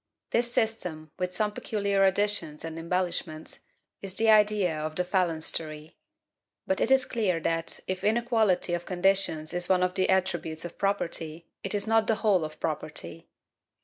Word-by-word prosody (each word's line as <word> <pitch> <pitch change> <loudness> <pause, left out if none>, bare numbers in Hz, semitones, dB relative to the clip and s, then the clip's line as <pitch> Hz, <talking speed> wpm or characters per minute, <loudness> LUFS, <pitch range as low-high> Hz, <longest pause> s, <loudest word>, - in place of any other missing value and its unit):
This 240 +1 +2
system, 180 -10 -1
with 180 0 -1
some 210 +3 -1
peculiar 200 -2 0
additions 190 -6 0
and 165 0 -6
embellishments, 170 -2 -3 0.4
is 195 -1 -5
the 225 0 +5
idea 210 -5 +4
of 155 0 -4
the 180 - 0
phalanstery. 160 -4 -1 0.7
But 190 - -1
it - - +2
is 265 -1 +4
clear 205 -10 0
that, 165 +1 -1
if 185 0 -3
inequality 220 -5 +2
of 175 0 -3
conditions 180 -4 +1
is 175 0 0
one 185 -1 +3
of 180 0 0
the 185 0 +1
attributes 175 -4 0
of 175 - -9
property, 170 -5 -2 0.2
it 195 - -2
is 205 - +2
not 225 0 +2
the 225 - +3
whole 205 -6 +2
of 155 0 -7
property. 150 - -4
185 Hz, 160 wpm, -28 LUFS, 165-205 Hz, 0.7 s, the